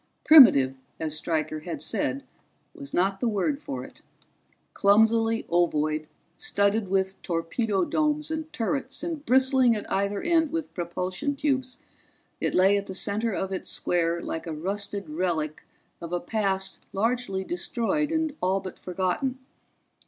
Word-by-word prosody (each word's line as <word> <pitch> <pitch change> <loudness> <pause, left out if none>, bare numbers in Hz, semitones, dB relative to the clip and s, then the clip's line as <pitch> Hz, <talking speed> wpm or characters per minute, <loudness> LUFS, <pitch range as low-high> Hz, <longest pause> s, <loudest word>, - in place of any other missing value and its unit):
Primitive, 210 - +8 0.3
as 155 -2 -2
Stryker 155 -1 -1
had 160 -1 -6
said, 135 +1 -2 0.5
was 140 0 -10
not 195 +2 +1
the 240 - 0
word 230 +7 0
for 280 -2 -5
it: - - -14 0.7
clumsily 225 +2 +3
ovoid, 155 -3 +1 0.3
studded 200 +1 +1
with 190 0 -1
torpedo 185 +4 -1
domes 300 - 0
and 315 0 -4
turrets 270 +4 -3
and 330 -4 -4
bristling 260 -2 +4
at 210 - -4
either 200 +1 0
end 330 -2 +3
with 330 -2 -4
propulsion 180 +9 -3
tubes, 265 -3 -1 0.6
it - - -1
lay 195 +2 +5
at 200 - -4
the 190 - -6
center 215 +4 0
of 190 -1 -3
its 190 - -4
square 170 -1 0
like 165 +1 -5
a 165 - -3
rusted 200 +3 -3
relic 155 -1 -2 0.4
of 170 0 -7
a 175 - 0
past 195 -1 -2
largely 220 -2 -1
destroyed 300 - -1
and 320 -2 0
all 190 +1 +1
but 190 -1 -9
forgotten. 185 +8 -2
200 Hz, 145 wpm, -26 LUFS, 175-260 Hz, 0.7 s, Primitive